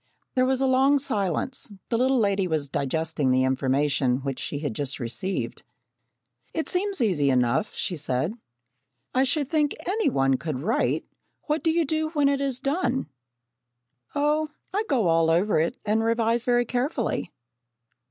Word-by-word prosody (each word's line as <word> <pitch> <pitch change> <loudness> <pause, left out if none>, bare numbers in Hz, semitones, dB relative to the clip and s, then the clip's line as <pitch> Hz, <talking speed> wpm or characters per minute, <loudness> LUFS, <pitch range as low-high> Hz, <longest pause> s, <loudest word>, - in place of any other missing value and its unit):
There 255 -1 +3
was 265 0 +1
a - - +3
long 265 +2 +4
silence. 215 - -1 0.2
The 230 - +1
little 260 +1 +3
lady 200 -4 +2
was 155 -4 -1
digesting 150 +1 -1
the 130 0 +3
information 130 0 +1
which 135 -2 -4
she 145 - -3
had 145 -4 -3
just 140 +3 -3
received. 120 +2 -3 0.9
"It 320 - -1
seems 390 -3 0
easy 170 -11 +2
enough," 125 - +1
she 190 -4 -2
said. 145 +3 -1 0.8
"I 260 - +3
should 285 +1 +1
think 300 -1 +1
any 415 -1 +1
one 135 - +2
could 140 -1 -4
write. 220 +9 0 0.4
What 305 +1 -1
do 325 - +3
you 330 0 +2
do 315 +2 -1
when 290 -3 +3
it 280 0 0
is 270 -3 -1
done?" 270 - -1 1.1
"Oh, 300 +2 +1 0.2
I 420 +3 0
go 245 -7 +2
all 165 0 +3
over 175 +2 +3
it 170 +11 0
and 220 +1 +2
revise 230 +1 +1
very 245 -1 +3
carefully." 245 0 -1
225 Hz, 160 wpm, -25 LUFS, -, 1.1 s, long